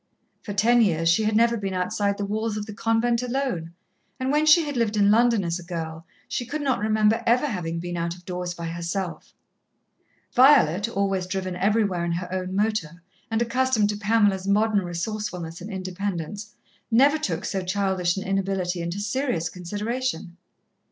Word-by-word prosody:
For 210 - -7
ten 230 +4 +4
years 165 -6 +2
she 215 +6 +3
had 215 0 +1
never 235 +1 +4
been 195 -4 -3
outside 200 +2 0
the 205 - -2
walls 215 +1 -2
of 210 - -4
the 215 - -8
convent 230 +2 +1
alone, 250 -10 -2 0.5
and 260 +1 0
when 300 +1 +2
she 320 +1 +7
had 290 -1 -4
lived 225 -3 0
in 205 0 +5
London 230 -2 +4
as 170 0 -2
a - - -10
girl, 165 -1 -6 0.2
she - - -2
could 290 +5 -4
not 265 -6 +1
remember 215 +1 +2
ever 245 +5 +4
having 175 - -3
been 175 +1 -5
out 170 0 -2
of 180 0 -18
doors 180 -1 -4
by 170 - -6
herself. 170 +2 -4 1.0
Violet, 235 - +5
always 195 -4 -1
driven 185 -1 -3
everywhere 200 -2 +1
in 170 0 -1
her 180 +1 -4
own 185 0 -3
motor, 195 -5 -1 0.3
and 225 +1 +1
accustomed 235 -3 +1
to 210 - -1
Pamela's 205 -2 +2
modern 210 0 +2
resourcefulness 175 -1 -4
and 200 - -7
independence, 195 +1 -5 0.3
never 275 +6 +4
took 180 - -2
so 190 -2 -2
childish 185 -1 0
an 195 - -3
inability 190 -2 -1
into 170 +3 -3
serious 205 - -1
consideration. 205 +1 -4
200 Hz, 175 wpm, -25 LUFS, 180-225 Hz, 1.0 s, she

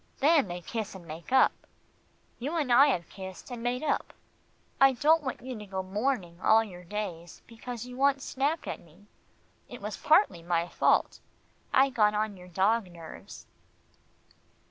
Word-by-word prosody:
Then 295 -3 +4
they 175 0 -6
kiss 220 +1 -5
and 180 -3 -11
make 165 +7 -9
up. 265 0 +6 0.9
You 290 +8 -3
and 275 -6 +1
I 275 +4 +8
have 175 -12 0
kissed, 190 +5 -10
and 240 -1 -6
made 245 +3 -1
up. 295 - -1 0.7
I 270 0 +6
don't 310 +6 +4
want 260 -4 -5
you 255 0 -5
to 210 - -8
go 190 -1 -3
mourning 190 -3 -2
all 225 +1 +5
your 180 -4 -10
days, 175 -3 -6
because 235 +1 -8
you 250 0 -9
once 275 0 +2
snapped 290 +4 -1
at - - -4
me. 170 +5 -20 0.6
It - - -9
was - - -5
partly 175 - +3
my 170 0 0
fault. - - +2 0.5
I 270 +1 +4
got 210 -4 +3
on 210 -1 -1
your 180 -1 -13
dog 195 +3 +1
nerves." 165 -2 -11
220 Hz, 165 wpm, -29 LUFS, 180-265 Hz, 0.9 s, I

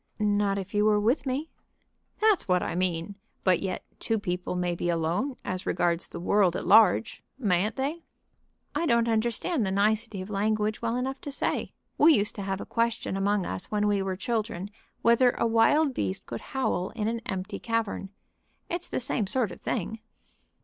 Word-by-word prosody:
"Not 205 -2 +1
if 195 +1 -6
you 210 0 +3
were 210 -1 +4
with 240 +7 +1
me." 280 +5 -2 0.7
"That's 430 -3 +3
what 180 -1 +2
I - - -2
mean. 180 +1 -1 0.3
But 185 -2 +4
yet 190 -2 -3
two 225 - 0
people 180 -3 -3
may 180 -1 0
be 175 0 -2
alone, 175 - 0
as 185 0 -3
regards 175 0 +1
the - - -8
world 185 0 +3
at - - -3
large. 215 0 +5 0.2
Mayn't 205 -4 +1
they?" 285 +5 -2 0.7
"I 335 - 0
don't 235 -1 +3
understand 235 - 0
the 195 - 0
nicety 210 +2 +1
of 185 +3 -6
language 215 +1 0
well 230 0 0
enough 265 +2 -3
to 285 - -6
say. - - -2 0.3
We 310 +1 +7
used 205 -2 +1
to - - -3
have 195 0 -2
a - - -6
question 230 -4 -1
among 195 0 +1
us - - -4
when 210 -1 +1
we 205 -1 +2
were 190 -1 -2
children 210 -2 -3 0.3
whether 240 +2 +5
a - - +1
wild 265 +6 +4
beast 95 - -2
could 115 - -6
howl 255 -8 -1
in 215 -2 -1
an 230 +1 -1
empty 195 -1 -4
cavern. 230 -4 -2 0.6
It's 350 +1 -3
the - - -1
same 235 -4 -1
sort 230 -2 0
of - - -11
thing." 225 0 -2
210 Hz, 185 wpm, -27 LUFS, 190-235 Hz, 0.7 s, We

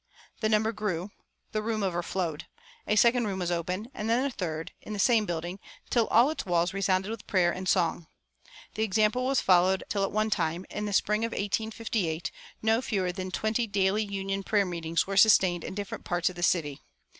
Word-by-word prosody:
The 215 - +1
number 220 +1 +2
grew. 205 -3 -3 0.4
The 215 - -1
room 215 -1 -2
overflowed. 175 -3 -2 0.4
A 210 - +2
second 235 +1 +4
room 195 -2 -2
was 175 -2 -2
opened, 180 +7 -3
and 215 +1 -4
then 245 +4 +2
a 280 - -1
third, 165 -7 -4
in 215 - -7
the - - -4
same 220 0 +3
building, 175 +3 -4 0.3
till 235 -3 +3
all 245 +6 +5
its 315 - -4
walls 175 -1 +1
resounded 195 +1 0
with 225 -2 -7
prayer 180 -3 +3
and 185 +1 -4
song. 170 -3 +1 0.7
The 215 - -4
example 215 +3 +2
was 270 0 +2
followed 185 +1 +4
until 200 -2 -2
at 195 - -1
one 215 +1 0
time, 170 0 -1
in 210 0 -3
the - - -3
spring 210 +3 +2
of 230 - -2
1858, 205 -5 -2 0.3
no 220 +2 +3
fewer 190 -7 -1
than 185 +1 -5
twenty 220 +4 -1
"daily 200 +1 +1
union 195 -1 -3
prayer 200 0 +1
meetings" 170 -2 -1
were 195 0 -3
sustained 185 -5 +5
in - - -6
different 205 -1 -5
parts 175 0 0
of - - -14
the 175 - -7
city. 155 -6 +1
195 Hz, 200 wpm, -28 LUFS, 175-215 Hz, 0.7 s, all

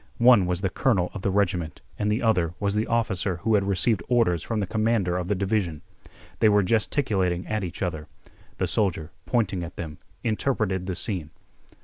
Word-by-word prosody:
One 120 -6 +6
was 90 0 -1
the 95 -2 0
colonel 95 -9 +1
of 100 - -6
the 100 - 0
regiment 90 -5 0 0.2
and 105 0 +1
the 110 - 0
other 90 -7 +2
was 100 -1 0
the 105 +1 0
officer 100 -5 0
who 110 0 +2
had 100 -2 +3
received 100 +1 +1
orders 115 -10 +3
from 115 -2 -2
the 100 - 0
commander 110 -3 +1
of 90 -1 -2
the 105 - +1
division. 95 -5 -1 0.6
They 110 - +5
were 105 -1 +4
gesticulating 95 -4 +1
at 110 -2 -1
each 90 +1 -4
other. 80 -4 -3 0.5
The - - 0
soldier, 85 -6 0 0.2
pointing 95 -4 0
at 85 +1 -8
them, 80 -3 -7 0.2
interpreted 110 -5 0
the 95 - -2
scene. 85 -4 -4
100 Hz, 190 wpm, -25 LUFS, 90-110 Hz, 0.6 s, One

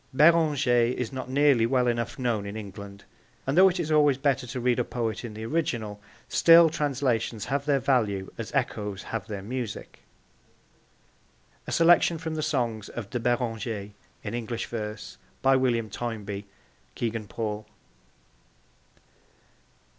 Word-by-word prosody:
Beranger 145 -6 +4
is 125 0 -3
not 130 -1 -5
nearly 135 -4 +4
well 125 0 +2
enough 120 -2 -1
known 115 -6 -1
in 100 +2 -6
England, 100 -1 -9 0.4
and 135 - 0
though 190 +2 +8
it 180 0 -3
is 160 -2 -2
always 145 -3 +4
better 135 -2 0
to 125 +2 -4
read 125 0 +1
a - - +2
poet 115 -2 -3
in 115 -3 -7
the 110 +1 -6
original, 115 -8 -2 0.3
still 165 -1 +6
translations 130 -8 -1
have 140 +1 -2
their 145 -2 +4
value 110 -8 0
as - - -6
echoes 105 -1 -2
have 115 -4 -5
their 100 -3 -5
music. 120 0 -5 1.7
A - - -4
Selection 170 0 +5
from 160 0 -5
the 155 - -2
Songs 120 -8 -1
of 110 -4 -7
De 120 - -1
Beranger 115 -4 -2 0.3
in 105 - -5
English 120 -1 -3
Verse. 105 -2 -6 0.2
By 135 0 +5
William 120 -4 +1
Toynbee. 105 -2 -5 0.5
(Kegan 115 -2 -3
Paul.) 105 +1 -4
120 Hz, 145 wpm, -27 LUFS, 110-140 Hz, 1.7 s, though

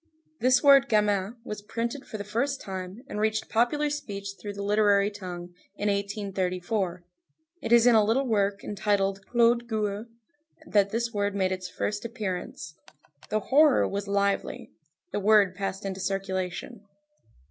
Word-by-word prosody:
This 255 0 +4
word 275 -1 +7
gamin 210 -1 +1
was 210 -3 -5
printed 235 +6 -4
for 215 - -6
the 205 - -5
first 260 +7 -1
time, 190 +4 -7
and 210 - -5
reached 220 0 0
popular 290 +6 +2
speech 205 -9 -5
through 205 -1 -5
the 200 0 -5
literary 205 0 +3
tongue, 180 -3 -8 0.2
in 205 +1 -1
1834. 195 -2 -2 0.6
It - - -4
is 235 0 +7
in 245 - +7
a 220 -1 +6
little 235 +6 +2
work 200 -4 0
entitled 195 -1 0
Claude 235 0 +3
Gueux 215 -1 -2 0.6
that 200 -7 +3
this 230 +2 -2
word 205 -1 -1
made 190 -2 +1
its 185 -1 -4 0.3
appearance. 205 -9 -5 0.6
The 215 0 0
horror 295 0 +5
was 200 0 -4
lively. 200 0 -1 0.4
The - - -1
word 205 -2 +4
passed 195 +1 -4
into 195 -1 -4
circulation. 190 +2 -3
205 Hz, 145 wpm, -27 LUFS, 195-230 Hz, 0.6 s, word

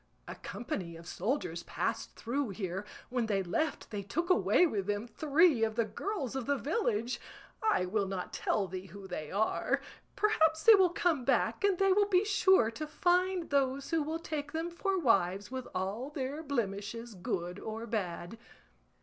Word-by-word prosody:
A - - -5
company 180 -8 -5
of 165 0 -11
soldiers 180 - -2
passed - - -3
through 260 +2 -2
here; 190 -1 -4 0.2
when 245 -2 0
they 195 -3 +1
left 290 - -2
they 205 -2 -3
took 340 - -1
away 360 0 +5
with 205 - -1
them 205 +1 -1
three 295 0 +3
of 220 -1 0
the 230 -1 +2
girls 280 - -4
of 265 -3 -3
the 285 0 +2
village; 245 - -1 0.4
I 435 - +2
will 200 +1 0
not 190 -2 -4
tell 200 -3 0
thee 185 +1 -6
who 195 +2 -10
they 155 -5 -5
are; 210 +3 +1 0.4
perhaps 320 -7 +3
they 455 - +10
will 380 -3 +6
come 335 -5 +1
back, - - +1
and 400 -2 +3
they 390 0 +4
will 410 +1 +3
be 375 +1 +4
sure 380 - +4
to 305 +6 -5
find 355 +2 +1
those 275 0 +1
who 325 -1 +2
will 315 +2 -2
take 300 -3 -5
them 325 +2 -2
for 385 +2 -1
wives 200 - +2
with 260 -1 -4
all 200 +8 -2
their 285 +1 -4
blemishes, 230 -4 -3
good 180 0 -3
or 220 +1 -5
bad. 205 -2 -4
245 Hz, 175 wpm, -32 LUFS, 200-325 Hz, 0.4 s, they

